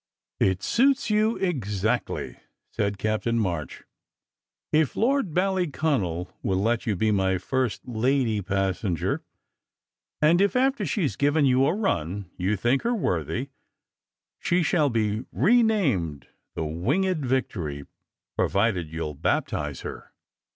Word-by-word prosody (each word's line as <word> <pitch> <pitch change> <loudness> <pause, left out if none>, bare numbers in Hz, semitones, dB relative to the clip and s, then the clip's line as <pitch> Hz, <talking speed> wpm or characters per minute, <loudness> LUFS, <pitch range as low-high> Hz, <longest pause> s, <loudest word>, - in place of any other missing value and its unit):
"It 95 -1 +1
suits 270 0 +2
you 215 +2 +3
exactly," 110 - -2 0.3
said 100 -1 -1
Captain 110 +3 0
March. 85 -9 -2 0.9
"If 155 -3 +2
Lord 260 - +1
Ballyconal 150 - 0
will 95 -2 0
let 115 +5 0
you 105 - +1
be 110 +4 +1
my 95 -2 +2
first 130 +6 -2
lady 120 -2 +1
passenger, 95 -2 -1 1.0
and 165 +4 +4
if, 200 -1 +2
after 270 +2 +2
she 195 -7 0
s 140 - -2
given 145 +1 +2
you 130 +1 +4
a - - +1
run, 95 - -2
you 95 +3 0
think 120 +7 +1
her 240 +1 0
worthy, 90 - -2 0.9
she 175 0 +1
shall 150 -2 +2
be 110 -1 -1
renamed 180 - +2 0.3
the 80 - -2
Winged 145 - 0
Victory, 90 - -2 0.5
provided 95 -6 +1
you 80 +1 -3
ll 75 - -4
baptize 75 -1 -1
her." - - -8
115 Hz, 125 wpm, -25 LUFS, -, 1.0 s, and